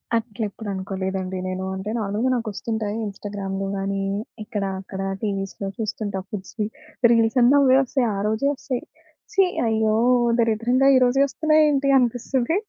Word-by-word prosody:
అట్లెప్పుడు 220 -2 -3
అనుకోలేదండి 190 0 -3
నేను. 185 0 -3
అంటే 190 +2 -5
నార్మల్‌గా 210 +4 -1
నాకొస్తుంటాయి 220 -1 -3
ఇన్‌స్టాగ్రామ్‌లో 195 -1 -4
గాని, 195 0 -2 0.4
ఇక్కడా 205 -3 -3
అక్కడా 195 0 -5 0.2
టీవీస్‌లో 195 -1 -3
చూస్తుంటా 205 -2 -3
ఫుడ్స్‌వీ. 210 +2 -4 0.4
రీల్సన్నీ 240 +3 +4
అవ్వే 265 -1 +5
ఒస్తయి. 250 -1 0
ఆరోజే 215 +6 0
ఒస్తయి. 255 -2 -4 0.5
ఛీ! 390 -2 +5 0.2
అయ్యో! 220 -1 +2 0.4
దరిద్రంగా 235 +4 +3
ఈరోజే 255 +2 +3
ఒస్తున్నాయేంటి 300 -1 +3
అనిపిస్తుంది. 250 - 0
220 Hz, 115 wpm, -23 LUFS, 195-245 Hz, 0.5 s, అవ్వే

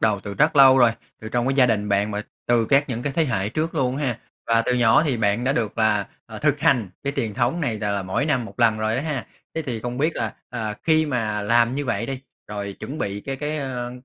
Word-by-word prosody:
đầu 105 -3 +2
từ 100 -1 -7
rất 150 +5 +2
lâu 135 -1 +8
rồi, 120 -2 +6 0.3
từ 110 - -7
trong 120 +1 0
cái 135 - +1
gia 130 -2 +5
đình 105 -3 0
bạn 100 +1 +1
mà 105 0 -3 0.2
từ 120 -1 +3
các 140 +5 +3
những 120 -2 -3
cái 145 - -2
thế 165 +3 +2
hệ 100 -8 -1
trước 155 +8 -2
luôn 130 -4 0
ha, 130 -5 -1 0.3
và 115 0 +3
từ 125 - 0
nhỏ 120 +2 +5
thì 145 -6 0
bạn 110 +1 +1
đã 135 - +2
được 115 -4 -2
là, 105 -3 +2 0.2
à, - - -8
thực - - +1
hành 120 -8 +3 0.2
cái 140 - -1
truyền 115 -6 -2
thống 125 +7 0
này 120 -8 -1
là 105 0 -2
là 100 -1 -1
mỗi 95 +10 -1
năm 130 -6 +1
một 115 - -9
lần 115 -2 +4
rồi 110 +1 0
đó 130 - -1
ha. 150 -6 -3 0.3
Thế 160 - -2
thì 125 -6 -4
không 120 +2 -4
biết 155 +4 0
là, 110 -2 -2 0.2
à, 110 -3 -3
khi 160 -1 +3
mà 110 -6 -1
làm 115 +3 +3
như 145 +1 -2
vậy 115 -2 -1
đi, 135 0 -4 0.3
rồi 100 -1 -5
chuẩn 145 +4 -6
bị 100 -4 -3
cái 135 +5 -5
cái, 150 +2 -3
ơ, 125 -3 -4
120 Hz, 270 wpm, -23 LUFS, 110-135 Hz, 0.3 s, lâu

